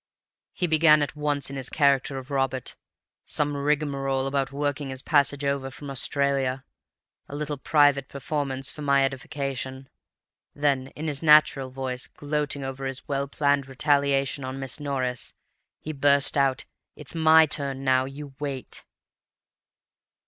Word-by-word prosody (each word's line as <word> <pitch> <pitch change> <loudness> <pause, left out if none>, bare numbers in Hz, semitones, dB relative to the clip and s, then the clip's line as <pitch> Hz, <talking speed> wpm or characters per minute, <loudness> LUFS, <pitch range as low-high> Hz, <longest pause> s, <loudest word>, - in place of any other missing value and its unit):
"He 180 - -1
began 155 -2 +5
at 145 - -4
once 145 -2 -1
in - - -6
his 135 -1 -1
character 140 -2 +2
of 130 +2 -8
Robert—some 135 +2 -3
rigmarole 140 -2 0
about 135 -1 -1
working 145 0 -2
his 130 0 -5
passage 145 -1 +2
over 140 -1 -1
from 140 +2 -9
Australia; 135 -1 0 0.6
a 145 - -7
little 150 -1 -4
private 145 -2 +3
performance 140 -2 -2
for 150 - -10
my 140 -1 +3
edification. 135 0 -4 0.7
Then 140 -3 +1
in 155 - -6
his 145 -2 -2
natural 150 -4 +5
voice, 130 -1 -4
gloating 145 -1 -3
over 135 0 -4
his 135 -1 -6
well 140 0 -1
planned 140 -1 +1
retaliation 140 0 +1
on 130 +1 -5
Miss 135 +2 -2
Norris, 130 -4 -3 0.4
he 155 - -6
burst 140 0 +3
out, 135 -2 +1 0.3
'It's 150 - -7
my 160 -1 +6
turn 140 -3 -3
now. 130 -1 +3
You 140 +1 -9
wait. 140 -4 -5
140 Hz, 140 wpm, -25 LUFS, 135-145 Hz, 0.7 s, my